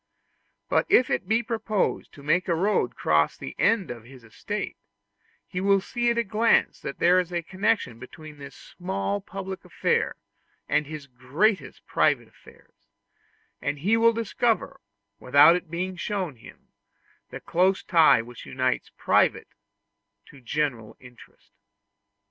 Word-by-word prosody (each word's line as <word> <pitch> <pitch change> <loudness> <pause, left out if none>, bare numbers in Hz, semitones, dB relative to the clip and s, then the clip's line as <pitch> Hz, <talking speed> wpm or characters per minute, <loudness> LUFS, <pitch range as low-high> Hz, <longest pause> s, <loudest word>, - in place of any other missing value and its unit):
But - - +1
if 250 - +4
it - - -1
be 225 +2 +2
proposed 220 -3 -2
to 140 - -14
make 170 +5 +1
a 170 - +1
road 185 - 0
cross 75 0 +1
the 65 - -8
end 215 - +2
of 120 -2 -8
his 125 0 -15
estate, 110 -1 -5 0.7
he 180 - -5
will 200 0 +4
see 240 +5 -1
at 235 - 0
a 235 - +2
glance 220 +3 +2
that - - -6
there 180 +2 +4
is 180 -1 -3
a 175 -1 -2
connection 185 - -1
between 150 +3 -12
this 140 -1 -10
small 100 - -4
public 190 -1 -7
affair - - 0 0.5
and 150 -1 +1
his 155 -2 -7
greatest 140 - -1
private - - +1
affairs; - - -21 0.7
and 145 +1 -2
he 195 +10 +2
will 230 0 +5
discover, 230 +1 -1 0.4
without 145 +6 +6
its 180 0 -4
being 180 +3 -4
shown 185 -3 -3
to 120 - -25
him, - - -16 0.6
the - - -8
close 185 +2 +1
tie 160 -9 +5
which 120 0 -12
unites 130 0 -1
private - - +2 0.8
to 140 - -16
general 125 -4 -3
interest. 125 -2 -17
170 Hz, 150 wpm, -25 LUFS, 130-200 Hz, 0.8 s, without